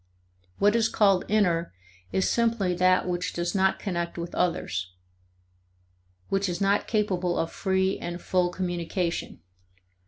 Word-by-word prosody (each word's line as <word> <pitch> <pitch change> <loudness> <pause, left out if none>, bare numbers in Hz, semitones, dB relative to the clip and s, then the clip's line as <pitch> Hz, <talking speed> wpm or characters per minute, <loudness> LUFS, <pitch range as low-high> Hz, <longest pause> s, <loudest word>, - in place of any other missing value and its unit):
What 205 +2 +3
is 225 -1 +3
called 195 -3 +3
inner 175 - +1 0.4
is 190 - +1
simply 230 -6 +1
that 185 +1 +3
which 180 0 -2
does 175 0 -2
not 190 -1 +2
connect 170 -3 -3
with 170 0 -5
others 90 - -1 1.4
which 195 0 0
is 175 0 -3
not 200 +1 +2
capable 185 -5 0
of 165 - -1
free 190 0 0
and 175 0 -5
full 180 0 +1
communication. 175 - -3
185 Hz, 130 wpm, -26 LUFS, 175-195 Hz, 1.4 s, What